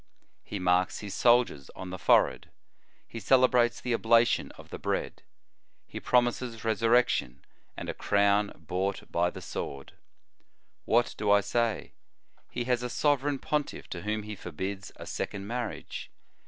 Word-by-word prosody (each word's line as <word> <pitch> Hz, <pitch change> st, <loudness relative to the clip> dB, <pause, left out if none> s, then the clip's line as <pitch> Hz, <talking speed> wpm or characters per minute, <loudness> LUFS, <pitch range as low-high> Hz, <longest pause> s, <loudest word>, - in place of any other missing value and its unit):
He 105 Hz, -, -5 dB
marks 90 Hz, 0 st, +1 dB
his 105 Hz, -2 st, -6 dB
soldiers 120 Hz, -, +3 dB
on 95 Hz, -1 st, -7 dB
the 95 Hz, -, -6 dB
forehead. -, -, +3 dB, 0.6 s
He 115 Hz, -, -7 dB
celebrates 125 Hz, -1 st, +4 dB
the 125 Hz, -, -2 dB
oblation 115 Hz, +1 st, +3 dB
of -, -, -14 dB
the -, -, -6 dB
bread. -, -, -2 dB, 0.6 s
He -, -, -7 dB
promises 120 Hz, -2 st, 0 dB
resurrection, 115 Hz, -, +2 dB, 0.3 s
and -, -, -6 dB
a -, -, -2 dB
crown 100 Hz, 0 st, +2 dB
bought 90 Hz, +4 st, -3 dB
by 85 Hz, +1 st, +2 dB
the -, -, -9 dB
sword. 70 Hz, -1 st, -6 dB, 0.9 s
"What 120 Hz, +2 st, +2 dB
do 105 Hz, -1 st, 0 dB
I 100 Hz, 0 st, +6 dB
say? 115 Hz, +1 st, -1 dB, 0.6 s
He 120 Hz, -, -3 dB
has 125 Hz, 0 st, 0 dB
a 125 Hz, -, -3 dB
sovereign 145 Hz, +1 st, +1 dB
pontiff 150 Hz, +2 st, -3 dB
to 85 Hz, -, -5 dB
whom 105 Hz, +2 st, -2 dB
he 105 Hz, 0 st, -6 dB
forbids 95 Hz, +3 st, -5 dB
a -, -, -9 dB
second 100 Hz, 0 st, -4 dB
marriage. 120 Hz, +1 st, -5 dB
110 Hz, 145 wpm, -29 LUFS, 95-120 Hz, 0.9 s, I